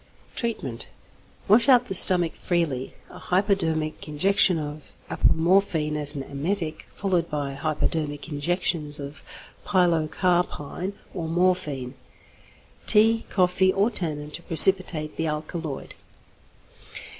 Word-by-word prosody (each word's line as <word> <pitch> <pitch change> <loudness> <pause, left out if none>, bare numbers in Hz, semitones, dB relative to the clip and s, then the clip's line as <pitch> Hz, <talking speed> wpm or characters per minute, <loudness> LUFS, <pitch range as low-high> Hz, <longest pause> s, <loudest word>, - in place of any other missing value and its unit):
Treatment. 140 - -4 0.6
Wash 230 +6 +4
out 250 -2 +5
the 220 - -5
stomach 175 -3 +6
freely; 155 -7 -3 0.2
a - - -12
hypodermic 170 -6 -1
injection 185 +4 +3
of 150 -1 -8 0.2
apomorphine 165 -3 +1
as 150 0 0
an 140 - -4
emetic, 155 +4 -4
followed 180 -4 -2
by 145 -2 -4
hypodermic 150 0 -3
injections 150 -1 -1
of 140 +2 -9 0.4
pilocarpine 175 -1 -1 0.2
or 170 -4 -5
morphine. 160 -7 -1 0.9
Tea, 225 +2 +4
coffee, 185 0 +2
or 200 +5 +1
tannin, 150 -7 -3
to 170 - -8
precipitate 165 -2 +4
the 160 - -2
alkaloid. 155 -1 -5
165 Hz, 105 wpm, -24 LUFS, 150-185 Hz, 0.9 s, stomach